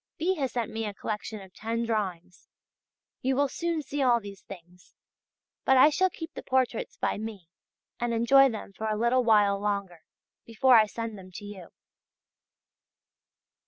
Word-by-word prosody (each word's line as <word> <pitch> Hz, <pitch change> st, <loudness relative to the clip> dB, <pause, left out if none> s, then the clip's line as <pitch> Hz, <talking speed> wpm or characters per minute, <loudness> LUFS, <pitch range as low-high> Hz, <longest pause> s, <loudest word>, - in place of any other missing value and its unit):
B. 355 Hz, +4 st, +1 dB
has 270 Hz, -4 st, -2 dB
sent 235 Hz, -2 st, -2 dB
me 225 Hz, 0 st, -3 dB
a 205 Hz, -, -6 dB
collection 215 Hz, +1 st, -5 dB
of 190 Hz, -1 st, -14 dB
ten 230 Hz, +1 st, -3 dB
drawings.... 190 Hz, -6 st, -4 dB, 0.7 s
You 265 Hz, +1 st, +1 dB
will 285 Hz, +1 st, +2 dB
soon 335 Hz, +2 st, -2 dB
see 285 Hz, +1 st, -4 dB
all 245 Hz, -3 st, +4 dB
these 200 Hz, -3 st, -10 dB
things; 180 Hz, -1 st, -14 dB, 0.7 s
but 265 Hz, -, +4 dB
I 290 Hz, +4 st, +7 dB
shall 375 Hz, +5 st, +2 dB
keep 330 Hz, -2 st, -8 dB
the -, -, -7 dB
portraits 260 Hz, -, -1 dB
by -, -, -1 dB
me, 210 Hz, -6 st, -7 dB, 0.5 s
and 240 Hz, 0 st, -1 dB
enjoy 270 Hz, +4 st, +5 dB
them 215 Hz, -4 st, -7 dB
for 220 Hz, +3 st, -4 dB
a 215 Hz, -1 st, -1 dB
little 240 Hz, +3 st, +2 dB
while 205 Hz, -3 st, +4 dB
longer, 200 Hz, -5 st, -3 dB, 0.4 s
before 245 Hz, +3 st, +3 dB
I 215 Hz, -2 st, +6 dB
send 225 Hz, -1 st, -6 dB
them 185 Hz, 0 st, -12 dB
to 205 Hz, -, -8 dB
you. 195 Hz, -4 st, -9 dB
225 Hz, 165 wpm, -28 LUFS, 200-260 Hz, 0.7 s, I